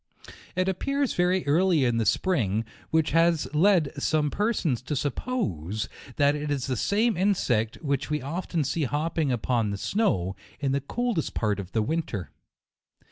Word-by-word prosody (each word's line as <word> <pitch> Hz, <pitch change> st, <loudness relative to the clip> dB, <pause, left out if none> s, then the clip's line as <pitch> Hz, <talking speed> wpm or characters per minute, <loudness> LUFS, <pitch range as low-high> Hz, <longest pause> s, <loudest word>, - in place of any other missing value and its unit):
It 185 Hz, +1 st, +1 dB
appears 275 Hz, +8 st, 0 dB
very 180 Hz, +1 st, +1 dB
early 160 Hz, 0 st, +3 dB
in 120 Hz, -2 st, +1 dB
the 115 Hz, -2 st, +1 dB
spring, 115 Hz, -, +1 dB, 0.2 s
which 160 Hz, -1 st, +2 dB
has 165 Hz, 0 st, +3 dB
led 170 Hz, -2 st, +4 dB
some 150 Hz, -1 st, +1 dB
persons 195 Hz, -, 0 dB
to 140 Hz, +4 st, -3 dB
suppose 115 Hz, -, -2 dB, 0.3 s
that 145 Hz, 0 st, +4 dB
it 150 Hz, 0 st, -3 dB
is 140 Hz, -3 st, -1 dB
the 130 Hz, -, -1 dB
same 215 Hz, -, +1 dB
insect 135 Hz, -, +1 dB
which 140 Hz, -1 st, -1 dB
we 150 Hz, 0 st, 0 dB
often 165 Hz, +3 st, -2 dB
see 145 Hz, +3 st, -1 dB
hopping 150 Hz, +1 st, 0 dB
upon 120 Hz, -2 st, 0 dB
the 100 Hz, -, -3 dB
snow, 95 Hz, -, 0 dB, 0.2 s
in 140 Hz, -3 st, 0 dB
the 140 Hz, +1 st, 0 dB
coldest 235 Hz, -, -2 dB
part 105 Hz, -3 st, 0 dB
of 95 Hz, -1 st, -7 dB
the 110 Hz, -, +2 dB
winter. 110 Hz, -, -3 dB
150 Hz, 160 wpm, -26 LUFS, 120-180 Hz, 0.3 s, led